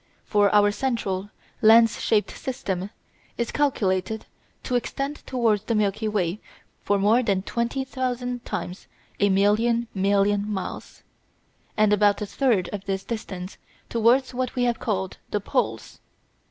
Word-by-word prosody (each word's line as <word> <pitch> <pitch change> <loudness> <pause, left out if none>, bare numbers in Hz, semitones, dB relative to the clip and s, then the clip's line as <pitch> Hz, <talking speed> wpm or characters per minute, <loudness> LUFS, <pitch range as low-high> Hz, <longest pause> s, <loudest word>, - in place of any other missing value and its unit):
For 205 -2 +3
our 205 0 +5
central, 205 -5 -2 0.3
lens 225 +1 +6
shaped 210 -2 +1
system 195 -7 -4 0.5
is 235 - -2
calculated 220 -7 0 0.4
to - - -4
extend 275 +4 -2
towards 225 -5 +1
the 230 - 0
Milky 215 +1 0
Way 200 -2 -1 0.4
for 205 - +1
more 210 +5 +4
than 200 -5 0
twenty 235 +5 -2
thousand 250 -2 -3
times 180 +2 -5 0.3
a 205 - +4
million 220 +5 +2
million 200 +1 +1
miles, 190 -3 -6 0.7
and 215 -1 +4
about 205 -1 +3
a 210 - -2
third 210 -5 +1
of 200 -1 -5
this 195 -1 -2
distance 195 -5 -6 0.3
towards 240 +3 +3
what 255 0 -2
we 250 - +1
have 240 -2 +1
called 190 -4 -2
the 210 - 0
poles. 200 - -2
215 Hz, 140 wpm, -24 LUFS, 200-240 Hz, 0.7 s, lens